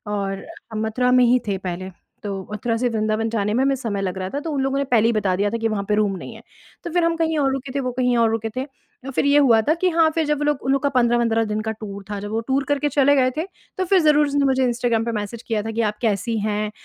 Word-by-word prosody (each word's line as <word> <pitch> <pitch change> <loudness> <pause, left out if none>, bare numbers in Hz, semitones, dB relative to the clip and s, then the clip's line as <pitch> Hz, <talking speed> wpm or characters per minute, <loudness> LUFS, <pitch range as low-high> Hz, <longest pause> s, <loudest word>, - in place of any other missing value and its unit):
और 195 -1 -3 0.3
हम 220 0 -2
मथुरा 250 +3 +1
में 250 - +6
ही 250 +1 +4
थे 200 -2 0
पहले। 185 0 -5 0.3
तो 200 -2 -3
मथुरा 225 +2 -1
से 245 - +2
वृंदावन 220 0 -1
जाने 210 -2 -1
में 255 - +2
हमें 275 0 +2
समय 220 -6 -3
लग 190 -1 -3
रहा 185 0 -3
था 285 - -1
तो 320 +1 -5
उन 280 - -1
लोगों 270 +1 0
ने 280 - +1
पहले 220 - +4
ही - - +3
बता 200 -4 +1
दिया 200 +2 +1
था 230 - -2
कि 225 0 0
वहाँ 210 -2 -2
पे 210 - +3
रूम 205 -2 +1
नहीं - - -9
है। - - -12 0.4
तो - - -4
फ़िर 350 0 +2
हम 335 0 +2
कहीं 320 -1 0
और 270 -2 +2
रुके 270 -1 -5
थे, 280 - +1
वो 255 -1 -2
कहीं 250 0 +1
और 230 -1 +4
रुके 225 0 -2
थे। 255 - -1 0.4
अ, 270 - -5
फ़िर 265 - 0
ये 285 +1 +4
हुआ 240 -6 +5
था 310 - +5
कि 365 +2 +1
हाँ, 330 -2 +3
फ़िर 320 0 0
जब 300 -1 0
वो 295 - -2
लोग 295 -2 0
उन 265 - +2
लोग 275 -1 +1
का 285 - +3
15 240 -3 +2
वंद्रह 225 -1 +2
दिन 210 0 -2
का 220 0 -3
टूर 200 -2 -8
था, 205 -1 -3
जब 205 +1 -6
वो 220 - 0
टूर 270 +1 +1
करके 290 0 +1
चले 285 0 +4
गए 255 -2 +3
थे। 320 - -1 0.3
तो 375 - 0
फ़िर 380 +1 +4
ज़रूर 300 -1 +4
उसने 285 0 +1
मुझे 265 -1 +2
इंस्टाग्राम 235 -2 0
पे 235 - -1
मैसेज 215 +1 -4
किया 220 -2 -1
था 225 - -4
कि 225 +1 -1
आप 210 - -8
कैसी 225 0 0
हैं, 210 0 -1
235 Hz, 305 wpm, -22 LUFS, 210-275 Hz, 0.4 s, में